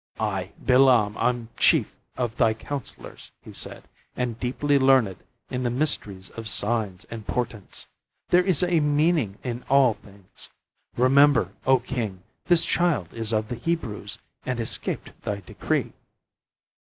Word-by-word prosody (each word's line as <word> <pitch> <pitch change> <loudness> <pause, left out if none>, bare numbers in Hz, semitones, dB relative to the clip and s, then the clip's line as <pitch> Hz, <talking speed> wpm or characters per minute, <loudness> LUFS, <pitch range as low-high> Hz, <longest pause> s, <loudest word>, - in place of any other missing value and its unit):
"I, 100 -4 -2
Bilam, 125 -5 +4
am 120 -2 0
chief - - +3 0.2
of 120 -3 -2
thy 110 -3 +3
counselors," 140 +4 -7
he - - -11
said, - - -7 0.3
"and 120 -2 -2
deeply 140 +3 +1
learned 130 -8 +4 0.3
in 125 - -2
the 125 - 0
mysteries 115 -8 -1
of 115 -1 -7
signs 105 -4 -1
and 110 -3 -7
portents. 115 -5 -3 0.4
There 180 +1 +5
is 180 -3 +3
a 175 -2 +3
meaning 150 - +2
in 120 -1 -4
all 135 -3 +5
things. 100 -2 -9 0.5
Remember, 130 -5 +5 0.2
O 130 0 +6
King, 115 -7 -4 0.2
this 175 -2 +5
child 170 - +1
is 115 -1 -2
of 110 -1 0
the 120 - -3
Hebrews, 115 -7 -3 0.3
and 125 -1 -2
escaped 115 - -2
thy 100 -1 -3
decree. - - -2
120 Hz, 140 wpm, -25 LUFS, 105-135 Hz, 0.5 s, O